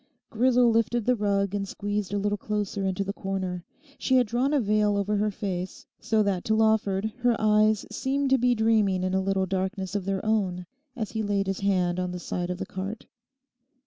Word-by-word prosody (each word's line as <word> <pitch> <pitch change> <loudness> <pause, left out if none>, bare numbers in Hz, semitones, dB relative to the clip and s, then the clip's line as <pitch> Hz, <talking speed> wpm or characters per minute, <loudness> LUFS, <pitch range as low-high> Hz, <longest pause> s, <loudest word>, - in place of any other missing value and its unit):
Grisel 245 +1 +4
lifted 230 0 +1
the 250 - +3
rug 200 -2 0
and 200 -1 -2
squeezed 205 0 -3
a 205 - 0
little 205 +1 0
closer 205 -1 -2
into 190 +1 -1
the 200 0 -4
corner. 190 -3 -4 0.4
She 260 - +1
had 250 -1 +5
drawn 245 +5 0
a 295 - +3
veil 210 -2 +2
over 200 +1 0
her 210 +1 +1
face, 190 -2 -5
so 220 -1 +1
that 195 -3 -1
to 220 - +2
Lawford 220 -1 +1
her 245 -1 +3
eyes 215 0 +3
seemed 270 +4 -1
to 265 - +5
be 245 0 +3
dreaming 215 -4 +2
in 185 0 -1
a 190 - +2
little 190 0 0
darkness 190 0 -3
of 200 -3 -2
their 195 +1 -2
own 190 -5 0 0.3
as 220 -5 -4
he 220 - -2
laid 205 -1 0
his 195 -1 -2
hand 185 -3 +1
on 180 0 -2
the 180 - -5
side 175 +1 -3
of 180 - -3
the - - -4
cart. 195 +4 -6
205 Hz, 210 wpm, -26 LUFS, 190-220 Hz, 0.4 s, had